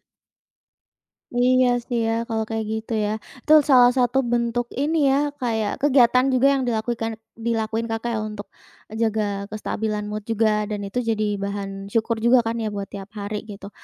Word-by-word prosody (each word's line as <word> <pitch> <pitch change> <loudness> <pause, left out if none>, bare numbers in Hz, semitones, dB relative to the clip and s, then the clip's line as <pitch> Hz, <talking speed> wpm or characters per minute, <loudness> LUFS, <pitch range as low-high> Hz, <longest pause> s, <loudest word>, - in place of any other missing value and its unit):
Heeh. - - -52 1.4
Iya 255 +1 +4 0.2
sih 240 -2 -1
ya, - - +1 0.2
kalau 220 -1 -1
kayak 225 -1 -2
gitu 220 +1 -4
ya. - - -1 0.4
Itu 305 - +5 0.2
salah 250 -2 +7
satu 245 0 +2
bentuk 240 0 0 0.2
ini 310 +3 +1 0.2
ya, 290 +2 +1
kayak 225 -5 -1
kegiatan 255 -3 +4
juga 255 +2 +4
yang 265 - -1
dilakuikan 225 -1 -1 0.3
dilakuin 225 0 -1
Kakak 225 +1 -3
ya, - - -1
untuk 210 -1 -8 0.4
jaga 215 -2 -1
kestabilan 210 0 -3
mood 210 0 -5
juga, 215 -2 +1
dan 210 -1 -4
itu 220 - -6
jadi 210 -2 0
bahan 195 0 -5
syukur 225 0 +1
juga 235 +3 +4
kan 230 0 -3
ya, 220 -2 -3
buat 200 -1 -5
tiap 200 +1 -9
hari 210 0 -5
gitu. 200 -2 -9
225 Hz, 170 wpm, -23 LUFS, 210-240 Hz, 1.4 s, salah